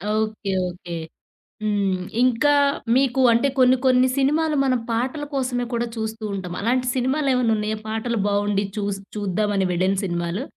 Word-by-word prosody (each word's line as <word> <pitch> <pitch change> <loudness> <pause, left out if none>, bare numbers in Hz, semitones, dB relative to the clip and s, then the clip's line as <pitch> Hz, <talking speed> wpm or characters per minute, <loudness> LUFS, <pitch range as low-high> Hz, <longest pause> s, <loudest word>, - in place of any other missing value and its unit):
Okay, 215 -2 -2 0.2
okay. 175 -1 -8 0.7
హ్మ్. 200 -3 0 0.2
ఇంకా 255 +4 +3 0.4
మీకు 265 -1 +2
అంటే 235 +5 +3
కొన్ని 255 0 +5
కొన్ని 255 0 +5
సినిమాలు 300 +3 +2
మనం 255 -2 +1
పాటల 255 +6 -1
కోసమే 250 -2 -1
కూడా 235 0 0
చూస్తూ 220 0 -4
ఉంటాం. 180 -3 -5
అలాంటి 250 +3 +1
సినిమాలేమన్నా 255 -3 +1
ఉన్నాయా? 215 +1 -2
పాటలు 225 +1 -2
బాగుండి 205 0 +1
చూస్ 200 -1 -2 0.2
చూద్దామని 205 +1 -1
అని 180 - 0
వెళ్లిన 185 +3 +1
సినిమాలు? 175 +5 -2
225 Hz, 140 wpm, -22 LUFS, 200-255 Hz, 0.7 s, కొన్ని